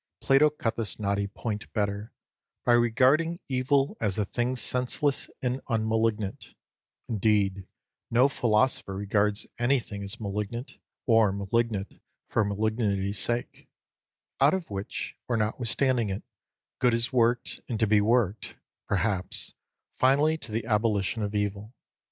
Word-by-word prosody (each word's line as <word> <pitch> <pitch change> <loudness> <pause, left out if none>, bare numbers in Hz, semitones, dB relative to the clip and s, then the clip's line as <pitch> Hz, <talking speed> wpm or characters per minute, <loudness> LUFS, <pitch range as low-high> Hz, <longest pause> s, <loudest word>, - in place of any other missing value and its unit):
Plato 135 +3 +5
cut 120 -6 -3
this 115 -1 -3
knotty 100 -1 0
point 105 +1 -5
better, 105 0 -2 0.5
by 120 - +5
regarding 135 +8 +3
evil 135 +1 +1
as 105 -3 0
a 105 - +1
thing 120 +5 -1
senseless 130 +4 +1
and 125 +1 -1
unmalignant 110 -3 -1 0.5
(indeed 100 -3 +1 0.4
no 125 +3 +5
philosopher 115 -5 +1
regards 100 +1 0
anything 120 -5 0
as 100 +5 -6
malignant, 105 +4 -4 0.3
or 115 -5 +4
malignant 100 +1 -2 0.3
for - - +2
malignity's 100 -1 0
sake); 120 0 -3 0.7
out 140 +6 +5
of 180 - -5
which, 100 0 -4
or 120 - 0
notwithstanding 115 +2 +1
it, 95 +1 -4 0.6
good 120 -2 +3
is 115 +3 0
worked, 120 0 +1
and 115 -3 -2
to 110 - +4
be 105 0 +4
worked, 110 -2 +1 0.3
perhaps, 100 -2 -1 0.5
finally 145 +4 +4
to 155 -8 -10
the 110 +1 -2
abolition 105 -1 +1
of 105 0 -3
evil. 105 +3 -2
110 Hz, 130 wpm, -27 LUFS, 100-125 Hz, 0.7 s, Plato